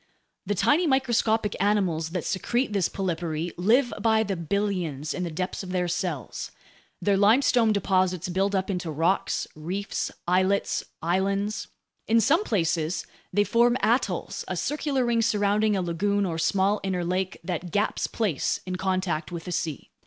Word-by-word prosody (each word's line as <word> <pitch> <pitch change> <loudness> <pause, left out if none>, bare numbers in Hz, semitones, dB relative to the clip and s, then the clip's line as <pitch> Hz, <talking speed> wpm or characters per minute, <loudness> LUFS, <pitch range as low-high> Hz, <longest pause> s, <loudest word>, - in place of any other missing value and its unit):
The 205 - 0
tiny 310 - +3
microscopic 230 -6 +2
animals 185 -6 +1
that 175 -1 -3
secrete 235 +5 -1
this 195 -4 +1
polypary 170 -3 -2
live 240 +8 +3
by 220 -1 +3
the 200 -3 -2
billions 170 -5 -2
in - - -4
the 175 - -2
depths 180 +4 -3
of 190 - -8
their 180 -1 0
cells. 170 - -3 0.5
Their 200 -1 +3
limestone 225 +2 +4
deposits 185 -3 +1
build 195 +3 0
up 190 +1 0
into 180 -3 -3
rocks, 165 +5 0
reefs, 180 +6 -3 0.2
islets, 185 +3 +2 0.2
islands. 195 +4 0 0.4
In 230 +1 +4
some 280 - +3
places, 165 - 0 0.3
they 205 +2 +3
form 240 +3 +3
atolls, 235 +5 0
a - - -3
circular 285 -3 0
ring 235 -1 +2
surrounding 210 -1 +2
a 190 - 0
lagoon 200 +4 0
or 165 -3 -2
small 195 +4 +2
inner 185 -2 -2
lake 185 +1 -2
that 175 0 -3
gaps 205 +5 0
place 200 - -1
in 185 0 -3
contact 185 -4 -1
with 170 -2 -5
the 180 - -6
sea. 165 -3 -3
190 Hz, 155 wpm, -26 LUFS, 175-215 Hz, 0.5 s, limestone